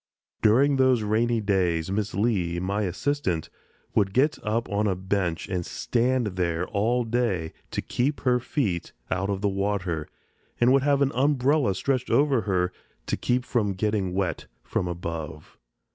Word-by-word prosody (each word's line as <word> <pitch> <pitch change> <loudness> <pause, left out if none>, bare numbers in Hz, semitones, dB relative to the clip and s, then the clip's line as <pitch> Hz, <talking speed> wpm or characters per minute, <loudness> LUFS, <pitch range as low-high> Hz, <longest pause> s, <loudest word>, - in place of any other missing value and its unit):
During 135 +6 +4
those 130 -4 +3
rainy 115 +2 +1
days 95 -4 +1
Miss 105 -1 -2
Lee, 95 -5 0
my 100 +3 -1
assistant, 95 - -1 0.4
would 100 -2 +1
get 145 +4 +3
up 115 +2 -1
on 105 +1 0
a 95 - +1
bench 95 -2 -1
and 90 -2 -2
stand 125 +6 0
there 85 -1 0
all 115 +5 +1
day 110 -9 -1 0.2
to - - -3
keep 140 +4 -1
her 125 -2 +3
feet 110 - -2 0.2
out 95 +2 0
of 100 -1 -1
the 105 - +2
water 95 -5 -1 0.5
and 120 +2 +5
would 135 - +5
have 140 0 +3
an 135 - +1
umbrella 135 -3 +2
stretched 130 +4 -1
over 135 0 +3
her 90 -1 +1 0.3
to - - -1
keep 125 0 0
from 105 -6 0
getting 95 -2 -1
wet 90 -5 -2 0.2
from 90 - -2
above. 85 -3 -6
105 Hz, 160 wpm, -26 LUFS, 90-125 Hz, 0.5 s, and